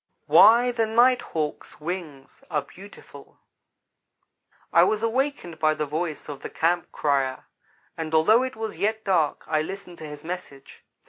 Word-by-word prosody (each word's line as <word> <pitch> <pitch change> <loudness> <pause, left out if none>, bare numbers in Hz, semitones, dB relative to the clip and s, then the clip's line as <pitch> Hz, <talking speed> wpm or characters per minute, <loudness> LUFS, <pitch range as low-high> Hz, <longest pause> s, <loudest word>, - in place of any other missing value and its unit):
Ho!" - - -12
WHY 240 +3 +7
THE 230 -2 0
NIGHT 245 +3 +4
HAWK'S 155 -2 -4
WINGS 155 -4 -7
ARE 150 -4 -1
BEAUTIFUL 195 +8 -15 1.4
I - - +7
WAS 215 0 +1
awakened 230 - -2
by 155 -1 +2
the 155 0 -2
voice 155 +2 -4
of 145 -2 -7
the - - -6
campcrier, 145 -5 0 0.5
and 160 -1 -5
although 215 +10 +5
it 260 0 -3
was 220 0 -5
yet 220 +1 -1
dark 170 -7 +1
I 155 -1 0
listened 180 +1 -8
to 155 - -7
his 150 0 -10
message. 160 -5 -8
175 Hz, 150 wpm, -25 LUFS, 155-220 Hz, 1.4 s, WHY